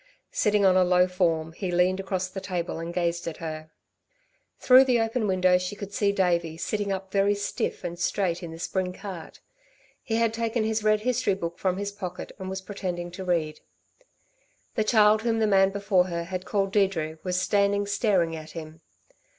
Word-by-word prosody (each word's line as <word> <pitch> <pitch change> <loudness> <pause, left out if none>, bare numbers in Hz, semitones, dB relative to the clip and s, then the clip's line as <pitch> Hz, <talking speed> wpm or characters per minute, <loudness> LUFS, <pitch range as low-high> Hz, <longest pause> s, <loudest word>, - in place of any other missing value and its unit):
Sitting 210 -1 +2
on 185 -1 +5
a 185 - +5
low 180 0 +4
form, 165 -3 0
he 185 +2 -4
leaned 180 +2 +2
across 190 -1 -2
the 190 +1 -7
table 175 -3 -3
and 165 +1 -5
gazed 170 -1 -1
at 165 - -4
her. 155 -1 -6 0.9
Through 255 +1 +7
the 250 -2 +3
open 225 0 0
window 185 -1 +3
she 180 +3 -4
could 200 -1 -8
see 200 0 +2
Davey 170 -4 0
sitting 205 +3 -2
up 190 0 -4
very 200 +1 +2
stiff 205 -1 -3
and 175 -1 -5
straight 180 -1 0
in 170 - -6
the 165 - -8
spring 180 +2 -2
cart. 185 -4 -9 0.6
He 225 - -3
had 230 -1 +2
taken 230 0 -1
his 220 0 -1
red 215 0 +3
history 245 -4 +1
book 170 -2 -5
from 185 -1 0
his 200 0 -3
pocket 185 -3 -7
and 190 0 -5
was 190 0 -4
pretending 180 -3 -5
to 190 +2 -7
read. 165 -4 -1 1.1
The 220 - +1
child 215 -1 +4
whom 230 0 0
the 220 - +2
man 195 -2 +4
before 200 -2 +2
her 170 -2 -3
had 185 +2 -5
called 195 -2 0
Deirdre 170 -6 0
was 180 -1 -1
standing 200 +1 +2
staring 195 -5 +1
at 155 -1 -9
him. 160 -1 -9
190 Hz, 190 wpm, -26 LUFS, 175-205 Hz, 1.1 s, Through